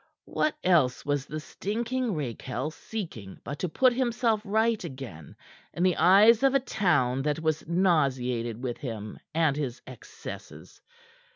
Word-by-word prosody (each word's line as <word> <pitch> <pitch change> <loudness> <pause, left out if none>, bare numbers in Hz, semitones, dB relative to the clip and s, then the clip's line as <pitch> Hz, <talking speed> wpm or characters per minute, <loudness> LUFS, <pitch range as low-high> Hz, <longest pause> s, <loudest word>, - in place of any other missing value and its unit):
What 305 - 0
else 160 -9 +3
was 145 -1 -1
the 155 - -4
stinking 230 +7 -2
rakehell 130 0 -4
seeking 155 - -7
but 145 - -6
to 180 - -1
put 255 +10 +4
himself 235 -3 +1
right 220 +1 +1
again 130 - -8 0.4
in 175 - 0
the 185 -1 +3
eyes 215 +5 +6
of 270 0 +4
a - - +6
town 145 - +1
that 150 +2 -1
was 160 -1 -1
nauseated 130 - +1
with 120 -2 -3
him 110 -7 -6 0.2
and 160 -4 +3
his 135 -4 -3
excesses? - - -10
155 Hz, 145 wpm, -28 LUFS, 130-215 Hz, 0.4 s, eyes